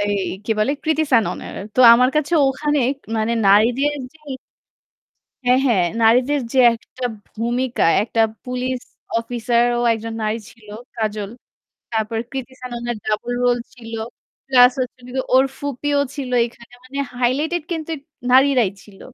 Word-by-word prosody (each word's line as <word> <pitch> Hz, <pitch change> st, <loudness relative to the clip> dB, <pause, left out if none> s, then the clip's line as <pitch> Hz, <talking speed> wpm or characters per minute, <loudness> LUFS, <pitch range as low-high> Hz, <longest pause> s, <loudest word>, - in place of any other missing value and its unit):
এই 205 Hz, 0 st, 0 dB, 0.3 s
কি 225 Hz, -, -5 dB
বলে? 215 Hz, +5 st, +2 dB
কৃতি 315 Hz, 0 st, +2 dB
সাননের। 230 Hz, -4 st, +1 dB, 0.2 s
তো -, -, +2 dB
আমার 250 Hz, +2 st, +4 dB
কাছে 305 Hz, +2 st, 0 dB, 0.2 s
ওখানে 295 Hz, +2 st, 0 dB, 0.4 s
মানে 220 Hz, +1 st, 0 dB
নারীদের 235 Hz, +8 st, +4 dB, 0.2 s
যে 315 Hz, -, -22 dB, 1.3 s
হ্যাঁ, 250 Hz, +1 st, +4 dB
হ্যাঁ। 205 Hz, -8 st, +3 dB, 0.2 s
নারীদের 250 Hz, +6 st, +4 dB
যে 265 Hz, -, +1 dB, 0.2 s
একটা 250 Hz, +2 st, -9 dB, 0.3 s
ভূমিকা, 240 Hz, +3 st, -1 dB, 0.2 s
একটা 225 Hz, +1 st, -1 dB, 0.2 s
police 250 Hz, 0 st, -3 dB, 0.3 s
officer 235 Hz, 0 st, 0 dB, 0.2 s
ও -, -, 0 dB
একজন 225 Hz, 0 st, -4 dB
নারী 215 Hz, +1 st, -1 dB
ছিল 220 Hz, -2 st, -20 dB, 0.3 s
'কাজল'। 215 Hz, -2 st, -3 dB, 0.6 s
তারপর 220 Hz, 0 st, -1 dB
কৃতি 265 Hz, -1 st, -6 dB
সাননের 240 Hz, -1 st, -4 dB
ডাবল 215 Hz, +3 st, -2 dB
রোল 245 Hz, 0 st, +3 dB, 0.2 s
ছিল। 230 Hz, -2 st, -11 dB, 0.5 s
Plus 250 Hz, -2 st, +6 dB
হচ্ছে 250 Hz, -1 st, -3 dB
হলো 245 Hz, -, -16 dB
গিয়ে 260 Hz, -, 0 dB
ওর 260 Hz, +1 st, +6 dB
ফুপীও 285 Hz, +1 st, -1 dB, 0.2 s
ছিল 275 Hz, -3 st, -5 dB, 0.2 s
এখানে। 235 Hz, 0 st, -14 dB
মানে 270 Hz, +2 st, -8 dB, 0.2 s
highlighted 295 Hz, +7 st, 0 dB
কিন্তু 325 Hz, -1 st, -3 dB, 0.4 s
নারীরাই 260 Hz, -4 st, +5 dB
ছিল। 200 Hz, -2 st, -17 dB
245 Hz, 140 wpm, -20 LUFS, 225-265 Hz, 1.3 s, Plus